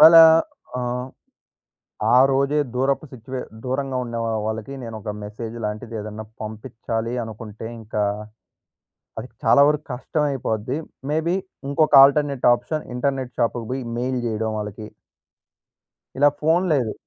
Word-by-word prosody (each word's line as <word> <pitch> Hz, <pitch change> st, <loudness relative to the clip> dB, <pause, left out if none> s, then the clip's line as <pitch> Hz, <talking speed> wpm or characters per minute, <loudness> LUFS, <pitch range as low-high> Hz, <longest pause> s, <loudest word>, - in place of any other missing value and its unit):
వాళ్ళ 160 Hz, +2 st, +10 dB, 0.6 s
ఆహ్, 125 Hz, +1 st, -2 dB, 1.1 s
ఆ -, -, +7 dB
రోజే 140 Hz, +2 st, +2 dB, 0.2 s
దూరపు 135 Hz, +4 st, +1 dB
సిచ్యువే 130 Hz, +1 st, -6 dB, 0.2 s
దూరంగా 130 Hz, +1 st, -2 dB
ఉండే 120 Hz, -1 st, -5 dB
వా 115 Hz, -, -1 dB, 0.2 s
వాళ్ళకి 110 Hz, +4 st, -4 dB
నేను 115 Hz, -1 st, -6 dB
ఒక 105 Hz, -, -4 dB
మెసేజ్ 110 Hz, +2 st, -6 dB
లాంటిది 110 Hz, +2 st, -4 dB
ఏద‌న్నా 110 Hz, +1 st, -6 dB, 0.2 s
పంపిచ్చాలి 115 Hz, +1 st, -4 dB
అనుకుంటే 110 Hz, -1 st, -8 dB, 0.2 s
ఇంకా 105 Hz, -1 st, -2 dB, 1.2 s
అది -, -, -6 dB, 0.2 s
చాలా 140 Hz, -, +6 dB
వరకు 150 Hz, 0 st, 0 dB
కష్టమైపోద్ది. 130 Hz, -3 st, -1 dB, 0.3 s
మే‌బీ 160 Hz, +3 st, +1 dB, 0.3 s
ఇంకొక 155 Hz, +2 st, +2 dB
ఆల్టర్‌నేట్ 140 Hz, -1 st, +2 dB
ఆప్షన్ 150 Hz, +6 st, -3 dB
ఇంటర్‌నేట్ 130 Hz, 0 st, -2 dB
షాపుకు 115 Hz, 0 st, 0 dB
బొయి 130 Hz, +1 st, -2 dB, 0.2 s
మెయిల్ 125 Hz, +1 st, -1 dB
జేయడం 110 Hz, -1 st, -1 dB
వాళ్ళకి. 105 Hz, 0 st, -6 dB, 1.3 s
ఇలా 145 Hz, +1 st, +7 dB
ఫోను 165 Hz, +4 st, +3 dB
లేదు. 125 Hz, -7 st, +1 dB
125 Hz, 125 wpm, -23 LUFS, 110-140 Hz, 1.3 s, వాళ్ళ